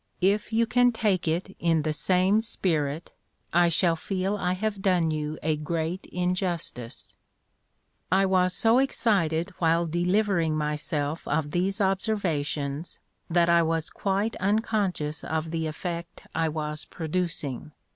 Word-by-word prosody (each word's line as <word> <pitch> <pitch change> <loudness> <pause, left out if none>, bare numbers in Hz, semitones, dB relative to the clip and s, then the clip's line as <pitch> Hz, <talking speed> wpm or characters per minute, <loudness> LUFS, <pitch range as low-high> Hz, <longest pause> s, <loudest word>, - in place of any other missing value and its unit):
If 205 +4 +2
you 230 +1 +3
can 245 +1 +4
take 210 -6 0
it 175 +4 -1
in 165 -2 +2
the 155 0 0
same 185 +6 +3
spirit, 160 -8 -1 0.4
I 175 0 +5
shall 170 0 +3
feel 190 +4 -2
I 180 -3 0
have 200 +1 -2
done 180 -4 +2
you 155 0 -3
a 155 0 +1
great 165 +4 -3
injustice." 180 - -1 1.0
I 195 +1 +4
was 185 -1 +2
so 230 +2 +4
excited 195 -10 +1
while 165 0 +3
delivering 175 -1 +1
myself 150 0 -2
of 150 0 0
these 190 +5 0
observations 170 -7 -1 0.3
that 170 0 +3
I 170 0 +5
was 165 -1 -1
quite 200 +3 -1
unconscious 195 -6 0
of 160 0 -2
the 160 -1 -1
effect 170 +2 -6
I 165 -1 +1
was 150 -1 -3
producing. 160 -4 -3
175 Hz, 135 wpm, -26 LUFS, 160-195 Hz, 1.0 s, I